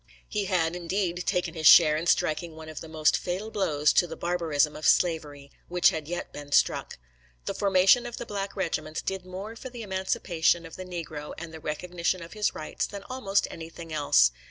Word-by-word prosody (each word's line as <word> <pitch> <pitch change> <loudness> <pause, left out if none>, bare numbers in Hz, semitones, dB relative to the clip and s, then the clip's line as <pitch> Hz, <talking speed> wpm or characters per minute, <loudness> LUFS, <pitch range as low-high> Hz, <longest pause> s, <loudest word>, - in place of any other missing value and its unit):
He 210 -1 -2
had, 175 -3 +1
indeed, 180 0 -2
taken 180 - 0
his 160 -3 +2
share 155 -3 +8
in 165 +3 -2
striking 160 0 +1
one 160 0 -10
of 155 - -7
the 160 - -8
most 155 -1 +2
fatal 190 +5 -3
blows 150 -8 +2
to 175 - +4
the 165 - -7
barbarism 160 -4 0
of 155 - -2
slavery 145 -5 +1 0.2
which 180 0 +4
had 155 -2 -5
yet 175 +1 -5
been 145 -1 -9
struck. - - +2 0.5
The - - -2
formation 195 +5 +4
of 240 - -7
the - - -5
black 200 -1 -4
regiments 160 -4 -3
did 190 -1 -3
more 195 +5 -7
for 260 +3 -8
the 240 -2 -8
emancipation 180 -3 0
of 165 - -10
the 185 - -7
negro 160 -4 -6
and 165 -1 -8
the 160 - -8
recognition 170 +3 -2
of 165 - -11
his 210 -1 0
rights, 155 - -3
than 200 -1 -8
almost 200 -6 0
anything 165 0 -9
else. 65 - +4
170 Hz, 200 wpm, -27 LUFS, 155-190 Hz, 0.5 s, share